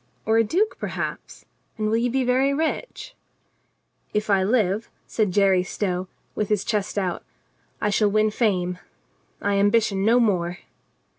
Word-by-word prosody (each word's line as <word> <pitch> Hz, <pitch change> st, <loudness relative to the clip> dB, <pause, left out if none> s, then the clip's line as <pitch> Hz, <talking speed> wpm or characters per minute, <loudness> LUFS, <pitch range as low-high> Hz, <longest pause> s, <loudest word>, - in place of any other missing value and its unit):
Or 220 Hz, +1 st, +3 dB
a -, -, +5 dB
duke, 370 Hz, -, 0 dB
perhaps? -, -, -5 dB, 0.3 s
And 215 Hz, -1 st, -1 dB
will 220 Hz, -, +1 dB
you 240 Hz, +1 st, +1 dB
be 265 Hz, +2 st, 0 dB
very 260 Hz, +3 st, +2 dB
rich 320 Hz, -, -3 dB, 0.5 s
?" -, -, -45 dB
"If 210 Hz, 0 st, 0 dB
I 195 Hz, -1 st, +4 dB
live," 210 Hz, 0 st, +1 dB, 0.2 s
said 215 Hz, -3 st, 0 dB
Jerry 195 Hz, -1 st, +4 dB
Stow, 185 Hz, 0 st, -3 dB, 0.3 s
with 210 Hz, -, -2 dB
his 210 Hz, -3 st, +1 dB
chest 210 Hz, -2 st, -2 dB
out, 185 Hz, -3 st, -1 dB, 0.6 s
"I 210 Hz, -, 0 dB
shall 205 Hz, +1 st, +3 dB
win 215 Hz, +1 st, +2 dB
fame. 180 Hz, -6 st, 0 dB, 0.6 s
I 200 Hz, 0 st, +1 dB
ambition 205 Hz, -1 st, +2 dB
no 230 Hz, +4 st, +4 dB
more." 180 Hz, -6 st, +1 dB
210 Hz, 155 wpm, -24 LUFS, 195-230 Hz, 0.6 s, a